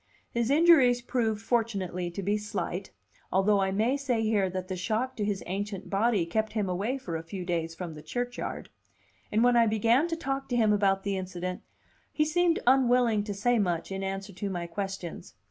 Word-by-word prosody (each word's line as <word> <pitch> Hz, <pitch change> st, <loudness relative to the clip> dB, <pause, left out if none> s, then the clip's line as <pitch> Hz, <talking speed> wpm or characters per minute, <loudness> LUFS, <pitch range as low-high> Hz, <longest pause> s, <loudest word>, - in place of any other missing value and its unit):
His 235 Hz, 0 st, 0 dB
injuries 285 Hz, -5 st, +6 dB
proved 225 Hz, -3 st, -1 dB
fortunately 195 Hz, -7 st, -1 dB
to 185 Hz, +3 st, -6 dB
be 205 Hz, +3 st, +1 dB
slight 205 Hz, -2 st, -4 dB, 0.4 s
(although 195 Hz, +3 st, +3 dB
I 190 Hz, 0 st, +1 dB
may 220 Hz, +8 st, +1 dB
say 250 Hz, -5 st, 0 dB
here 210 Hz, -3 st, +2 dB
that 185 Hz, 0 st, -4 dB
the 185 Hz, -, -3 dB
shock 225 Hz, +8 st, -1 dB
to 210 Hz, -, -1 dB
his 205 Hz, -2 st, -1 dB
ancient 195 Hz, +1 st, -4 dB
body 205 Hz, -2 st, +2 dB
kept 220 Hz, +6 st, -1 dB
him 210 Hz, -3 st, 0 dB
away 200 Hz, +9 st, -1 dB
for 180 Hz, -11 st, -5 dB
a 160 Hz, -, -2 dB
few 180 Hz, +2 st, -7 dB
days 165 Hz, -2 st, -2 dB
from 170 Hz, -1 st, -6 dB
the 150 Hz, -, -10 dB
churchyard), 245 Hz, +7 st, -4 dB, 0.6 s
and 220 Hz, +2 st, +3 dB
when 245 Hz, 0 st, +5 dB
I 230 Hz, -1 st, +5 dB
began 230 Hz, +8 st, +3 dB
to 330 Hz, -, -2 dB
talk 270 Hz, -4 st, -3 dB
to 245 Hz, -, 0 dB
him 215 Hz, -3 st, +4 dB
about 195 Hz, -2 st, +2 dB
the 200 Hz, -1 st, -1 dB
incident, 180 Hz, -1 st, -4 dB, 0.5 s
he 305 Hz, -, +1 dB
seemed 340 Hz, +2 st, +2 dB
unwilling 245 Hz, -4 st, +4 dB
to 205 Hz, -, -3 dB
say 240 Hz, +4 st, +2 dB
much 175 Hz, -3 st, -1 dB
in 195 Hz, 0 st, -3 dB
answer 195 Hz, +1 st, -4 dB
to 195 Hz, +2 st, -4 dB
my 175 Hz, -2 st, -3 dB
questions. 190 Hz, 0 st, -6 dB
210 Hz, 195 wpm, -28 LUFS, 190-240 Hz, 0.6 s, injuries